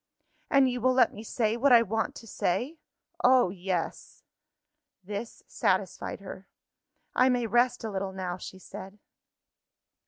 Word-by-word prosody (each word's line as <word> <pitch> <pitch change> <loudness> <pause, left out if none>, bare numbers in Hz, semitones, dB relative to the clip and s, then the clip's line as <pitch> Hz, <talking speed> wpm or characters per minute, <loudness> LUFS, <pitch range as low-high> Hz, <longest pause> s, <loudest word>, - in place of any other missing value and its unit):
"And 275 -1 +5
you 250 -1 -2
will 255 +1 +3
let 255 - +4
me 210 - -8
say, 225 -1 0
what 265 +3 +3
I 235 -1 +8
want 225 +1 -2
to - - -10
say?" 250 - -2 0.4
"Oh, 250 -7 +5
yes!" 180 -2 -4 0.8
This 205 +4 -6
satisfied - - -1
her. - - -9 0.7
"I 255 +1 +4
may 245 -2 +1
rest 240 +2 +2
a 220 - -3
little 195 0 -3
now," 185 -2 -4
she 190 - -9
said. 190 +1 -10
225 Hz, 145 wpm, -28 LUFS, 190-250 Hz, 0.8 s, I